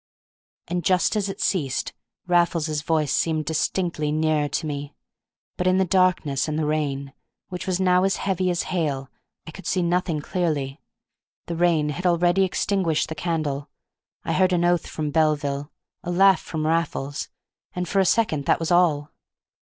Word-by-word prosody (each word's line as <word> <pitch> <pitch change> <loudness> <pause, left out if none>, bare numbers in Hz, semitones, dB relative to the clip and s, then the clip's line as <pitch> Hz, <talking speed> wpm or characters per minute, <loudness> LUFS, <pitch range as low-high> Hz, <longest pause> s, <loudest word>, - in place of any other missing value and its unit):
And, 175 0 -2
just 185 +4 +2
as 205 -2 0
it 195 - -6
ceased, 145 -9 -1 0.3
Raffles's 170 -3 +1
voice 155 -2 0
seemed 155 -2 0
distinctly 160 -1 -1
nearer 155 -1 +1
to 160 - -2
me; 145 -1 -5 0.6
but 180 - 0
in 185 0 +4
the 190 - +3
darkness 175 -7 +2
and 155 0 -2
the 155 - 0
rain, 140 -3 -2 0.4
which 180 0 -6
was 185 -1 0
now 180 -1 +3
as 195 0 +2
heavy 185 -1 -1
as 175 -1 0
hail, 140 -6 -1 0.3
I 160 - -8
could 180 +2 -10
see 185 - +1
nothing 175 -2 0
clearly. 150 -4 -2 0.6
The 170 - -4
rain 165 -3 +2
had 180 +5 -2
already 175 +2 +3
extinguished 185 -4 0
the - - -3
candle. 150 -3 -2 0.6
I - - 0
heard 185 0 +3
an 175 -1 +2
oath 175 -1 +2
from 150 -2 -3
Belville, 145 -2 0 0.3
a - - -5
laugh 190 0 +5
from 155 -1 -4
Raffles, 155 -3 -1 0.5
and 180 0 -2
for 195 - +1
a - - +5
second 160 -12 +1
that - - +3
was 165 +1 -2
all. 160 -5 +3
165 Hz, 170 wpm, -24 LUFS, 150-180 Hz, 0.6 s, laugh